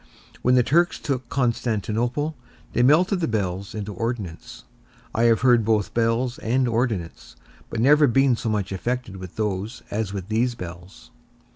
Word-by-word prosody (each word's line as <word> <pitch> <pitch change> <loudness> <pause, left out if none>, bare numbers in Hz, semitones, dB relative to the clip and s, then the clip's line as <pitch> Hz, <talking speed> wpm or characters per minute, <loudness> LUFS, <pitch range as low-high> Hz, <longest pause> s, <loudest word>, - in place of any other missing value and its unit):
When 125 +1 +3
the 125 - +5
Turks 170 +7 +2
took 130 -4 -3
Constantinople, 120 +3 -1 0.4
they 120 - +2
melted 175 +9 +4
the 165 - 0
bells 100 -3 -2
into 105 -1 -4
ordnance; 95 - -5 0.5
I 115 - +2
have 115 -2 +4
heard 120 -3 +5
both 105 -2 +1
bells 115 +2 0
and 125 +3 +1
ordnance, 115 - -2 0.3
but 115 - -4
never 145 +5 +5
been 135 0 +3
so 115 - -3
much 100 -3 -1
affected 120 +1 -3
with 95 -2 -9
those 105 +2 -3
as 105 -1 -2
with 95 -2 -5
these 120 +3 0
bells. 85 - -10
115 Hz, 155 wpm, -24 LUFS, 100-125 Hz, 0.5 s, the